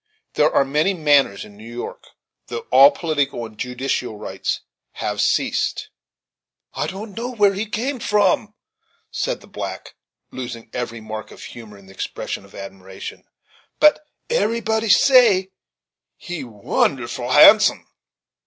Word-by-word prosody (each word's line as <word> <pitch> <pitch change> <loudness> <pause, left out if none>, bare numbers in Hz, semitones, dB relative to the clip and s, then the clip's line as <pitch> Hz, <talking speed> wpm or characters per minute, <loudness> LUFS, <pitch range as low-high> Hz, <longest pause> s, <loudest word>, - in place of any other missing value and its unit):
There - - +3
are 140 - +3
many 150 +8 +1
manors 145 - +2
in 100 - -15
New 110 +3 -12
York 120 +1 -7 0.4
though 120 -1 -6
all 135 +2 +9
political 145 -8 -2
and 110 -1 -12
judicial 125 -1 -3
rights 105 - -4 0.3
have - - -3
ceased. - - 0 0.8
"I - - -2
don't 200 +2 -7
know 235 +2 -4
where 205 -2 +4
he 205 +3 -3
come 250 +6 -3
from," 210 0 +1 0.6
said - - -2
the - - -16
black, - - -7 0.4
losing 120 -3 -7
every 115 -2 -4
mark 110 0 -7
of - - -13
humor 110 -4 -11
in 100 - -17
an 95 - -15
expression 95 - -5
of 100 - -18
admiration, 95 -1 -9 0.5
"but 300 0 +5 0.2
eb'rybody 225 - 0
say, 220 -8 +5 0.7
he 175 -3 -6
wounerful 120 +2 -2
handsome." 210 +9 +7
135 Hz, 135 wpm, -21 LUFS, -, 0.8 s, all